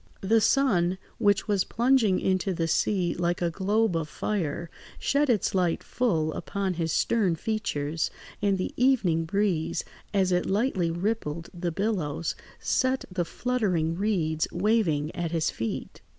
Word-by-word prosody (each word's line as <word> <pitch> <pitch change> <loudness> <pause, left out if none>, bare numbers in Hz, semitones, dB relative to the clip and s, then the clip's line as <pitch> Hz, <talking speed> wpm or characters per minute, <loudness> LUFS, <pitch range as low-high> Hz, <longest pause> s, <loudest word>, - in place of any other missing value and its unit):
The 220 +3 +3
sun, 195 -7 +3 0.2
which 205 -2 +3
was 200 -3 +2
plunging 235 -5 +3
into 190 0 0
the 165 0 0
sea 180 +1 +1
like 175 0 -1
a 175 -1 0
globe 205 +2 +1
of 160 -2 -2
fire, 170 -2 -2 0.3
shed 285 0 +1
its 220 -6 +2
light 180 -3 +1
full 160 -11 0
upon 200 -2 -2
his 165 -2 -2
stern 195 -2 +2
features, 165 -7 -2 0.3
and 200 -1 +2
the 185 - -3
evening 210 -11 +2
breeze, 180 -3 0 0.3
as 190 -2 +2
it 180 0 +1
lightly 195 -4 +1
rippled 170 -3 -2
the 175 -1 -2
billows, 170 -5 -1 0.3
set 260 0 +1
the 180 -2 -1
fluttering 185 -8 0
reeds 170 -6 0
waving 175 -7 +1
at 175 -1 -2
his 165 -1 0
feet. 115 0 -5
185 Hz, 145 wpm, -27 LUFS, 165-215 Hz, 0.3 s, The